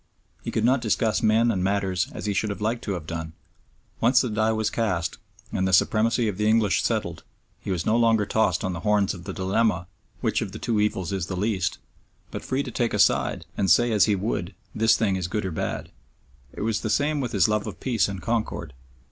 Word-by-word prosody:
He - - -5
could - - 0
not 130 +1 +3
discuss 110 -1 +1
men 115 +2 +3
and 95 -4 -1
matters 95 -2 0
as - - -7
he 105 - 0
should 105 +2 0
have 100 - -4
liked 115 +3 -1
to 100 - -1
have 85 -4 -5
done. 80 -1 -5 0.7
Once 125 +3 +4
the 125 - -2
die 110 +1 +1
was 110 -1 0
cast 95 -7 -1 0.3
and 95 - 0
the 95 - -1
supremacy 115 +5 +3
of 100 -3 -3
the 105 - +2
English 110 -3 +3
settled, - - -2 0.4
he - - -8
was 90 -4 -1
no 110 - +2
longer 115 -3 +3
tossed 100 -3 +1
on 95 -2 -1
the 85 - -5
horns 105 -1 +2
of 85 -2 -10
the - - -4
dilemma, 95 0 0 0.3
Which - - 0
of 105 +2 -5
two 115 -3 0
evils 95 -4 -1
is 95 -4 -2
the 90 - -4
least? 95 -3 -1 0.5
but - - -6
free 130 +2 -1
to 125 - -6
take 115 -2 -1
a - - -1
side - - +2
and 95 - 0
say 120 +7 +5
as 105 -4 +5
he 105 - +2
would, 95 -2 -3 0.2
This 110 0 +3
thing 100 -4 +1
is 90 -2 -2
good 105 +2 -2
or 95 - -2
bad. 80 - -4 0.6
It - - -8
was 110 0 0
the 110 - -2
same 145 +7 +1
with 125 - -3
his 95 -5 +3
love 105 -1 0
of - - -7
peace 120 -4 +1
and 100 -2 -6
concord. 110 - -2
105 Hz, 230 wpm, -25 LUFS, 95-115 Hz, 0.7 s, say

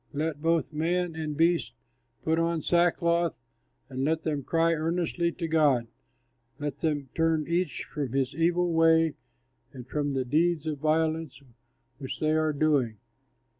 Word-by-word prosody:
Let 150 0 -2
both 165 0 +1
man 170 +2 -1
and 155 -2 -4
beast 165 -7 +2 0.5
put 160 +1 +1
on 165 -1 0
sackcloth 170 -1 +2 0.5
and 130 0 -4
let 160 +2 0
them 150 -3 -1
cry 165 +4 +2
earnestly 170 +1 -1
to 170 - -4
God; 150 -7 +3 0.7
let 145 -2 -4
them 145 -4 -1
turn 160 -2 +1
each 170 -1 -1
from 140 -5 -5
his 135 -2 0
evil 175 +1 +1
way 165 -1 +4 0.6
and 125 -2 -10
from 145 0 -2
the 130 -1 0
deeds 160 +4 +1
of 150 -2 -3
violence 155 -1 0 0.6
which 135 -2 -6
they 155 0 +1
are 155 0 +2
doing. 140 -7 +1
160 Hz, 145 wpm, -28 LUFS, 145-165 Hz, 0.7 s, way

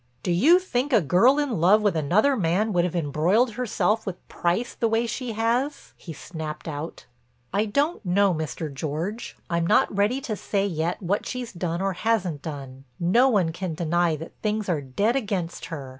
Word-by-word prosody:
"Do 180 - 0
you 280 - +6
think 290 -7 -2
a 235 - +6
girl 195 - +4
in 265 - -1
love 205 +5 +5
with 205 -5 +2
another 185 - +3
man 200 +2 +1
would 175 -1 +3
have 180 - -3
embroiled 170 - +2
herself 225 -2 0
with 185 -3 -7
Price 180 +8 -1
the 230 - 0
way 225 +1 +1
she 240 0 -4
has?" 240 +6 -1
he 170 - -10
snapped 155 0 -7
out. 155 +1 -6 0.5
"I 205 +2 +2
don't 285 +9 0
know, 195 +1 +3
Mr. 155 -1 -4
George. 160 - -4
I'm 170 -1 0
not - - +3
ready 210 +6 +2
to 220 -5 -3
say 200 0 -1
yet 170 0 -2
what 195 +4 -1
she's 250 -3 -5
done 175 0 -2
or 195 -1 0
hasn't 180 -7 -1
done. 135 -3 -8
No 230 +10 +4
one 190 -9 +2
can 175 -1 -4
deny 170 0 +1
that 160 +2 -9
things 215 -1 -1
are 165 -6 0
dead 200 - 0
against 200 -9 -2
her. 145 -6 -7
190 Hz, 190 wpm, -25 LUFS, 165-225 Hz, 0.5 s, you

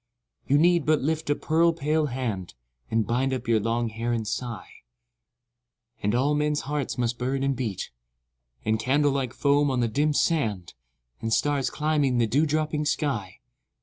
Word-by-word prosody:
You 140 - +4
need 170 0 +3
but 155 -3 +3
lift 160 +1 -1
a 145 - +3
pearl 165 +3 +2
pale 155 0 0
hand. 115 - -4 0.3
And 110 -1 +1
bind 130 +5 0
up 130 - -6
your 115 -1 +3
long 115 +2 -1
hair 115 +2 -3
and 110 -2 -2
sigh; 115 -1 -5 1.2
And 105 +3 +1
all 135 +4 +2
men's 150 0 +1
hearts 145 -1 -3
must 120 -1 -1
burn 135 +2 -1
and 135 0 +1
beat; 115 -7 -4 0.7
And 110 0 +1
candle 140 +5 +2
like 135 -3 -1
foam 145 +1 +2
on 130 -2 0
the 120 - +2
dim 145 +6 +1
sand, 110 - 0 0.5
And 115 - -2
stars 140 +1 +1
climbing 150 -4 +1
the 120 - +3
dew 140 +8 +2
dropping 155 0 0
sky. 130 - -2
135 Hz, 170 wpm, -26 LUFS, 115-150 Hz, 1.2 s, You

